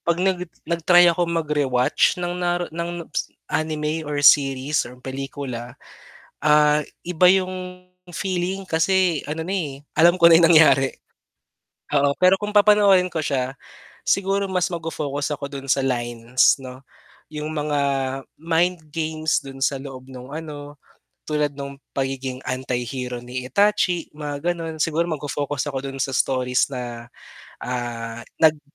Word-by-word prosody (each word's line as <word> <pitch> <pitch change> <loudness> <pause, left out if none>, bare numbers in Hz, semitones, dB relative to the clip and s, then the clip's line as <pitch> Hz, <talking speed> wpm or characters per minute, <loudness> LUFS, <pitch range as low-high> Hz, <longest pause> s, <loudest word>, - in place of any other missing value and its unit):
'pag 170 0 +2
nag 180 -1 0 0.2
nag-try 175 +1 +5
ako 175 0 -1
magre-watch 145 -6 +1
ng 175 0 -2
naru 175 0 0
ng 170 +1 -4
s - - -2
ng - - -37 0.2
anime 155 0 -1
or 150 - -2
series 140 0 +4
or 125 - -13
pelikula, 130 -2 -6 0.7
ah, 150 0 +5 0.2
iba 180 0 +2
yung 185 -1 0 0.3
feeling 185 +1 -2
kasi 175 -1 +2
ano 155 +2 -3
na, 185 - -4
eh, 145 -7 -4
alam 170 +3 +6
ko 170 - +9
na 165 - +9
yung 165 -1 +5
nangyari. 140 -4 +6 1.0
Oo, 140 -1 +3
pero 185 +1 +6
kung 210 0 -3
papanoorin 205 -3 +5
ko 160 - -1
siya, 130 -1 -1 0.5
siguro 195 +1 +1
mas 180 0 +1
ma 170 - -2
fo-focus 145 -2 -3
ako 140 - -6
dun 135 -1 -7
sa 135 - +3
lines 120 0 +1
'no, 130 0 -10 0.5
yung 150 0 -4
mga 150 -1 -1 0.6
mind 165 +1 0
games 155 -1 -1
dun 135 -1 -10
sa 140 -1 0
loob 135 -2 -9
nung 130 0 -10
ano, 145 -2 -8 0.5
tulad 150 -1 0
nung 140 0 -6 0.2
pagiging 135 -1 -2
anti-hero 125 -1 -3
ni 125 +1 -6
Itachi, 185 -1 +1
mga 150 +3 -3
gano'n. 165 -2 -6
Siguro 165 +2 0
magfo-focus 145 -2 -3
ako 135 - -2
dun 135 - -8
sa 135 0 -2
stories 125 -1 +1
na, 120 -2 -6 0.6
ah, 120 -2 -4 0.2
nag 155 -2 +4
150 Hz, 145 wpm, -22 LUFS, 135-170 Hz, 1.0 s, ko